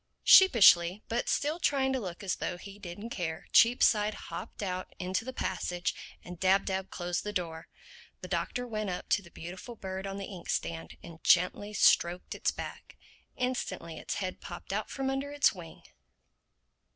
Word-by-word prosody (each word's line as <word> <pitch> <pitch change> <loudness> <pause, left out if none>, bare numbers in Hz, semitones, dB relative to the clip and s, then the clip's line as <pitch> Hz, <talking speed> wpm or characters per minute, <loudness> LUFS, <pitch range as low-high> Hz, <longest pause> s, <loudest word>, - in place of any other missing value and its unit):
Sheepishly, 200 - +7
but 235 +1 -1
still 305 +4 0
trying 270 -4 +2
to 260 - 0
look 185 -4 -6
as 190 - -1
though 180 - -3
he 200 +2 -11
didn't 205 +5 -8
care, 160 -6 -4
Cheapside 215 -3 +5
hopped - - -7
out 185 -1 -4
into 185 +3 -2
the 260 - -5
passage 180 -6 -2 0.3
and 180 -1 -9
Dab 190 +1 +3
Dab 190 0 -2
closed 175 0 -3
the 210 - -3
door. 165 -4 -4 0.5
The - - -7
Doctor 245 -1 -2
went 215 -4 -3
up 180 - -5
to 205 - +3
the 180 - -15
beautiful 185 +9 -9
bird 190 -2 -5
on 195 0 -5
the 200 - -5
ink 185 -4 -10
stand 165 -1 -3
and 165 -1 -12
gently 180 +4 +3
stroked 175 -2 +3
its - - 0
back. - - -7 0.4
Instantly 190 -10 -3
its - - -4
head 185 -2 -4
popped 175 +2 -7
out 215 +1 -2
from 270 -1 -3
under 270 +1 -2
its 290 0 +3
wing. 175 -4 -11
190 Hz, 175 wpm, -30 LUFS, 175-225 Hz, 0.5 s, Sheepishly